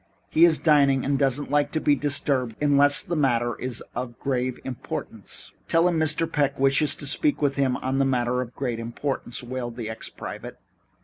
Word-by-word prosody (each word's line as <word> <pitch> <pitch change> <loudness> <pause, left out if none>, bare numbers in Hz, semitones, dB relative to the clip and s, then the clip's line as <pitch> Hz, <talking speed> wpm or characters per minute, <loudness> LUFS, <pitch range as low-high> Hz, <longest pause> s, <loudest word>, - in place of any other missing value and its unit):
He 165 +2 +6
is 165 -3 +4
dining 140 -4 +3
and 140 0 +1
doesn't 140 +1 0
like 145 0 +2
to 160 - +1
be 150 - +3
disturbed 140 -4 0
unless 145 0 +4
the 175 -3 -3
matter 120 -5 +1
is 125 -2 -3
of 120 -1 -5
grave 130 -2 -2
importance." 130 -3 -7 0.2
"Tell 165 +1 +3
him 170 -2 +1
Mr. 160 +1 +1
Peck 140 -2 0
wishes 135 +2 +3
to - - -8
speak 290 - +1
to 145 - +2
him 135 -2 0
on 135 +1 -1
a - - +3
matter 125 -1 +1
of 125 - -4
very 120 - -23
great 125 -4 -3
importance," 120 +1 -3
wailed 120 -1 -5
the 115 -2 -5
ex 110 - -7
private. - - -8
135 Hz, 195 wpm, -25 LUFS, 125-145 Hz, 0.2 s, He